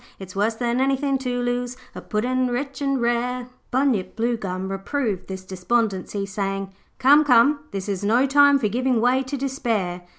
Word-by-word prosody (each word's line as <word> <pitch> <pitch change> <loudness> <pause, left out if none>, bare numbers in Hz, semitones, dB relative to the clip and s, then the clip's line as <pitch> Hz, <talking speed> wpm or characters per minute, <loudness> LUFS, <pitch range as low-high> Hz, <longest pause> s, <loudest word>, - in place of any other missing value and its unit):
It's 190 -1 -10
worse 210 +3 +1
than 240 +2 0
anythin' 270 0 +1
to 250 -2 -2
lose 245 0 -2 0.2
A - - -8
Puddin' 250 +4 0
rich 275 +3 -3
and 275 -1 0
rare.' 240 +1 0 0.2
Bunyip 245 -8 0
Bluegum 195 -5 -2
reproved 200 0 -2
this 190 -1 -6
despondency, 195 +1 -1
saying, 195 0 -3 0.2
'Come, 280 +3 +6
come, 280 +2 +5
this 195 -4 -5
is 200 -1 -3
no 235 +6 +3
time 285 +1 +5
for 230 - 0
giving 250 +3 +1
way 250 +3 +3
to 270 +2 -4
despair. 225 -10 -2
240 Hz, 165 wpm, -23 LUFS, 195-265 Hz, 0.2 s, Come